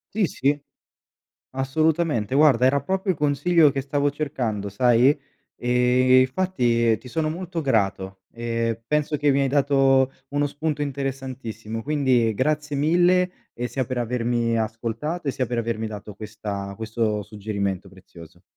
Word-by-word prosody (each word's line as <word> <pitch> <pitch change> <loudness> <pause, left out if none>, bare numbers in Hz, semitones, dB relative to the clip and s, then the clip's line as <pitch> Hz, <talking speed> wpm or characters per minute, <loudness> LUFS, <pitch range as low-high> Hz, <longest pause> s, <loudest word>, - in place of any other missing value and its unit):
Sì, 210 -4 +2
sì, 140 +1 0 1.0
assolutamente, 135 -3 0
guarda 135 -5 +5
era 140 +2 +3
proprio 190 +3 -1
il 180 - 0
consiglio 150 +2 +3
che 135 - -1
stavo 140 +1 0
cercando 120 -9 -3
sai. 120 +4 +4 0.5
Ehm, 125 +1 +3
infatti 125 -6 +1
ti 125 - -13
sono 155 +5 -1
molto 170 +1 -4
grato, 95 -8 -1
e 115 -1 -2
penso 150 0 0
che 145 -1 +2
mi 140 - +2
hai 135 - +1
dato 135 -1 +3 0.2
uno 145 +1 0
spunto 150 +1 -3
interessantissimo. 130 -5 -4
Quindi 130 -6 +2
grazie 150 +4 -1
mille, 175 +5 +2
e 120 - -3
sia 130 +1 -2
per 130 0 -4
avermi 120 -1 0
ascoltato 115 +9 -3
e 140 - +1
sia 130 - -2
per 120 0 -3
avermi 115 -1 -2
dato 105 -1 -8
questa 105 -2 -6
questo 110 -1 -2
suggerimento 100 -2 -4
prezioso. 85 -3 -15
130 Hz, 140 wpm, -23 LUFS, 115-145 Hz, 1.0 s, guarda